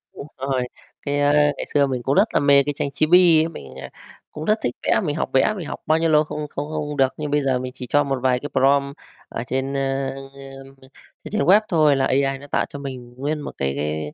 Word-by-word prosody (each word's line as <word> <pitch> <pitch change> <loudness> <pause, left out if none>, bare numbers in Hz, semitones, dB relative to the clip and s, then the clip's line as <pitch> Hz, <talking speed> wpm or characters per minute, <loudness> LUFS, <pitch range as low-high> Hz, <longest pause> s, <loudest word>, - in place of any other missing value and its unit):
Đúng 140 - -8
rồi, 135 -1 -1 0.4
cái, 145 0 -2
a, 145 0 +3
ngày 145 0 +2
xưa 145 -1 +3
mình 130 -2 -3
cũng 135 - 0
rất 200 +4 +4
là - - +3
mê 140 -1 +5
cái 145 +1 -2
tranh 140 - -2
Chibi 165 +1 +5
á, 165 - -3
mình, 70 - -11
à, 65 - -8 0.4
cũng 155 - -7
rất 215 - +3
thích 120 - -1
vẽ, - - +2
mình 150 -4 -2
học - - -2
vẽ, 135 +11 +3
mình 170 -6 -6
học - - -6
bao 155 - +3
nhiêu 165 0 +1
lâu 155 -1 +4
không 150 0 -5
không 145 - -4
không 155 -1 -2
không 150 - -5
được, 135 -1 +2
nhưng 150 -1 -4
bây 145 0 +2
giờ 135 -2 0
mình 130 0 -5
chỉ 130 -1 -8
cho 145 +4 +3
một 135 -2 -2
vài 125 -1 +2
cái 145 - -6
prompt 140 +2 +2 0.3
ở 115 - -5
trên, 135 +1 -2
ơ, 135 0 -1
ờm, 135 0 -12 0.5
trên - - -9
trên 215 +1 0
web 200 +4 +5
thôi 155 -4 +4
là 135 -1 +1
AI 135 +1 +1
nó 145 - -12
tạo - - 0
cho 140 - -8
mình 130 -3 -8
nguyên 150 +3 -2
một - - -6
cái 70 0 -1
cái, 75 +1 -3
140 Hz, 265 wpm, -22 LUFS, 135-150 Hz, 0.5 s, mê